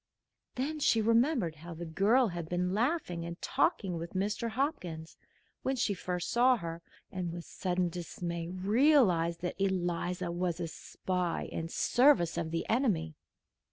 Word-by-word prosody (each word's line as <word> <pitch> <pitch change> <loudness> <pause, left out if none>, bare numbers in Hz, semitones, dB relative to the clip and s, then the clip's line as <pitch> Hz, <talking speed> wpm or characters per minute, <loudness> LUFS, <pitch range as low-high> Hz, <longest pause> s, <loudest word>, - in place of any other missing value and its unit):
Then 295 +5 -2
she 230 -5 +3
remembered 230 - +2
how 170 +2 -9
the 170 +2 -6
girl 210 +9 +3
had 170 -2 -5
been 180 +1 0
laughing 220 - 0
and 170 +1 -6
talking 180 -4 0
with 170 +3 -7
Mr. 210 +4 -1
Hopkins, 200 - -3 0.5
when 265 - 0
she 235 -4 +1
first 180 -1 -3
saw 250 +1 +5
her, 170 -3 -6 0.3
and 180 -2 -3
with 170 0 -7
sudden 180 -1 -1
dismay 170 0 -5
realized 190 - +3
that 180 +2 -4
Eliza 180 -1 -1
was 175 0 -1
a 170 - -2
spy 180 +1 -3
in 165 - -4
the - - -13
service 245 - +4
of 160 - -2
the 165 0 -2
enemy. 200 - +1
180 Hz, 155 wpm, -31 LUFS, 170-230 Hz, 0.5 s, saw